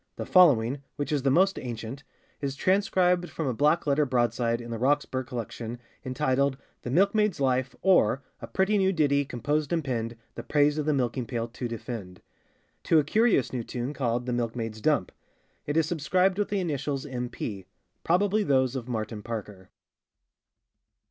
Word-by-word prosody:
The - - -5
following, 140 -7 +5
which 145 0 -3
is 145 -2 +1
the 135 - +2
most 190 +8 +3
ancient, 120 +3 -6 0.4
is 140 -1 -2
transcribed 180 0 +2
from 160 - -4
a 130 - 0
black 150 +7 +2
letter 145 +1 +3
broadside 120 -2 +1
in 120 0 -8
the 115 - -4
Roxburgh 130 -1 0
Collection, 120 0 -5 0.3
entitled 130 0 0 0.2
The - - -5
Milke 190 +9 +3
maid's 210 -6 +1
Life; 130 -1 0
or, 140 - +4 0.2
a - - -6
pretty 200 +2 +1
new 190 0 +3
ditty 145 -5 +2
composed 145 +4 -2
and 165 -2 +1
penned, 115 -3 -3 0.2
the - - -6
praise 145 0 +2
of 150 - -2
the - - +4
Milking 125 -2 -1
pail 115 -2 -2
to 120 +1 -5
defend. 110 -5 -7 0.6
To 165 - +4
a 155 - +5
curious 215 - +2
new 125 -2 -2
tune 125 +4 -4
called 120 -3 -1
the 125 - -2
Milke 120 -1 -1
maid's 115 -2 -5
Dump. 145 -10 +1 0.6
It 145 +2 0
is 165 - +4
subscribed 180 +4 +1
with 205 - 0
the 205 - 0
initials 145 -5 -2
M. 125 -3 -4
P.; 100 -5 -6 0.4
probably 200 +5 +2
those 130 -7 +2
of 125 -2 -4
Martin 110 -2 -3
Parker. 105 -4 -7
135 Hz, 175 wpm, -27 LUFS, 120-160 Hz, 0.6 s, following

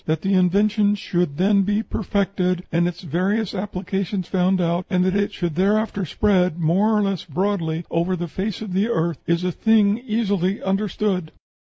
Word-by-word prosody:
That 160 0 -1
the 195 0 +1
invention 205 +3 +3
should 175 -7 -2
then 200 +2 +3
be 205 +3 0
perfected, 190 -4 -1
and 170 +1 +2
its 175 -1 -5
various 185 +6 -1
applications 190 -1 -3
found 185 0 +1
out, 175 +1 0
and 180 -1 +2
that 185 +1 +1
it 205 0 +1
should 175 -3 -3
thereafter 200 +2 +1
spread 185 -1 +1
more 190 +7 +2
or 210 - +2
less 195 -3 -1
broadly 170 -1 -2
over 170 +3 0
the 175 -1 -4
face 195 +5 -4
of 200 -4 -6
the 195 +4 +1
earth, 170 -6 -1
is 170 +1 +1
a 180 - 0
thing 215 +2 +3
easily 205 -5 -1
understood." 190 -3 -1
190 Hz, 175 wpm, -22 LUFS, 175-205 Hz, -, invention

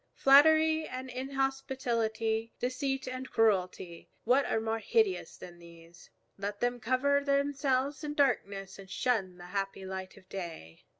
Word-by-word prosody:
Flattery 315 +3 +5
and 255 0 -6
inhospitality, 250 -4 -1
deceit 265 +1 -2
and 255 +1 -5
cruelty, 185 -5 0
what 255 +4 +3
are - - 0
more 225 0 -2
hideous 410 - 0
than 175 -1 -11
these? 170 0 -16 0.3
Let 205 +1 -4
them 245 0 0
cover 265 +5 +2
themselves 280 0 0
in 295 0 -4
darkness 200 -9 0
and 195 -1 -11
shun 195 -7 -1
the 175 - -11
happy 195 -1 -3
light 190 0 -6
of 185 -2 -17
day. 165 - -8
245 Hz, 135 wpm, -31 LUFS, 195-270 Hz, 0.3 s, Flattery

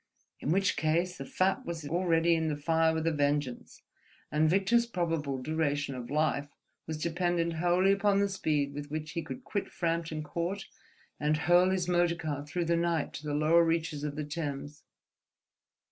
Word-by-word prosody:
In 150 - -1
which 190 +1 +2
case, 170 +3 0
the 135 - -5
fat 190 +1 +1
was 165 -3 -5
already 170 0 +2
in 160 -1 +1
the 150 - 0
fire 160 +2 +2
with 160 0 -2
a 165 - +3
vengeance, 145 -3 -1 0.5
and 155 +2 +3
Victor's 200 +7 +3
probable 165 - -1
duration 145 0 -1
of 125 -2 -7
life 145 -1 0 0.4
was 160 -1 -3
dependent 170 +1 0
wholly 180 +3 +3
upon 200 0 +3
the 200 - +3
speed 150 -7 -1
with 145 0 -6
which 155 +1 -4
he 170 - -2
could 250 - -8
quit 200 -5 -3
Frampton 165 -2 -2
Court 175 +5 -3 0.5
and 150 +2 +1
hurl 175 +3 +4
his 185 -2 0
motor 175 -1 +2
car 150 -4 -4
through 170 +4 -2
the 170 +1 +2
night 170 -3 0
to - - -7
the 145 - -1
lower 160 +3 +5
reaches 165 -3 -1
of 145 -1 -3
the 150 -1 -3
Thames. 145 -2 -5
165 Hz, 175 wpm, -30 LUFS, 150-175 Hz, 0.5 s, lower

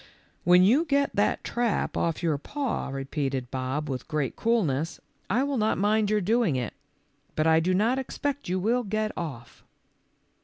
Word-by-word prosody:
"When 180 +1 +7
you 250 - +5
get 280 -2 +1
that - - +1
trap 240 -3 -1
off 165 0 -1
your 155 -4 +1
paw," 275 - -3
repeated 135 -2 -3
Bob 130 +3 -2
w 135 -3 -2
T 125 - -6
ith - - -24
great 150 -5 -2
coolness, 170 - 0 0.2
" - - -40
I 240 +7 +2
will 280 -1 -1
not 215 +1 +1
mind 210 +1 +2
your 210 0 +2
doing 215 - +2
it. 125 -3 -2 0.6
But 155 - +1
I 160 0 +5
do 180 +3 +1
not 230 +7 +2
expect 285 -1 -3
you 185 +1 0
wdll 230 +3 0
get 215 +1 0
off. 130 -9 -7
185 Hz, 185 wpm, -27 LUFS, 150-230 Hz, 0.6 s, When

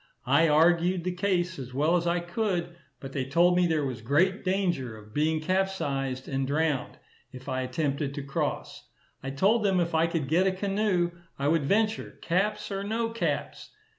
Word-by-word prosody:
I 145 +6 +4
argued 170 +3 +3
the 180 - -1
case 180 -2 -1
as 125 -1 -8
well 155 +5 +2
as 170 -1 0
I 175 +1 +1
could, 175 -2 -2 0.2
but 135 - -8
they 135 - -1
told 170 +7 +3
me 180 0 +3
there 155 -3 0
was 130 -4 -4
great 170 - +2
danger 175 - -1
of 105 0 -15
being 155 +1 +1
capsized, 145 -8 -1
and 135 -1 -1
drowned, 150 -1 -1 0.3
if 130 +1 -11
I 130 -1 -1
attempted 140 +2 -2
to 145 - -4
cross. 140 0 -4 0.3
I 135 - -5
told 200 +11 +2
them 195 -3 +2
if 170 -1 -1
I 160 +1 +3
could 165 -5 -2
get 175 +6 +3
a - - +3
canoe 195 -2 0 0.3
I 140 - -1
would 160 -3 +2
venture, 215 +6 0
caps 210 +5 -1
or 195 0 -2
no 225 +2 -1
caps. 230 - -3
170 Hz, 185 wpm, -27 LUFS, 140-185 Hz, 0.3 s, I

